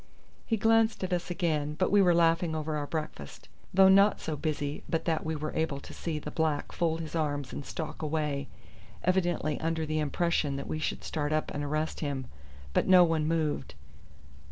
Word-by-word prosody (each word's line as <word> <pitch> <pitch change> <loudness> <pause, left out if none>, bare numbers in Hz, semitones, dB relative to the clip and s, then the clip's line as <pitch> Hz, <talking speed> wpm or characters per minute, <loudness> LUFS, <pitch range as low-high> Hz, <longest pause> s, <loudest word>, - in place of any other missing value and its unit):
He 225 - +1
glanced 225 0 +3
at 185 0 -1
us 175 0 -2
again, 155 -5 -1
but 185 - +1
we 205 0 +6
were 175 -3 +5
laughing 165 -1 +3
over 155 0 -2
our 145 -1 -2
breakfast, 150 - -6 0.2
though 190 +1 +6
not 195 +2 +6
so 155 - -3
busy 145 -1 -3
but 165 - -1
that 165 -2 0
we 160 0 -2
were 155 0 -4
able 160 -3 -1
to - - -11
see 165 -3 -3
the 150 - -6
black 160 -2 -1
fold 165 -1 0
his 155 - -7
arms 145 -5 -1
and - - -5
stalk 155 +2 -6
away, 150 -3 -1 0.6
evidently 175 -5 +1
under 160 0 -1
the 155 0 -1
impression 150 -1 0
that 140 - -4
we 155 - -3
should - - -3
start 150 -2 -2
up 155 0 0
and 145 - -3
arrest 155 +2 -2
him; 140 -3 -3 0.5
but - - +2
no 185 -1 +8
one 160 -2 +1
moved. 155 - -1
160 Hz, 195 wpm, -29 LUFS, 150-170 Hz, 0.6 s, no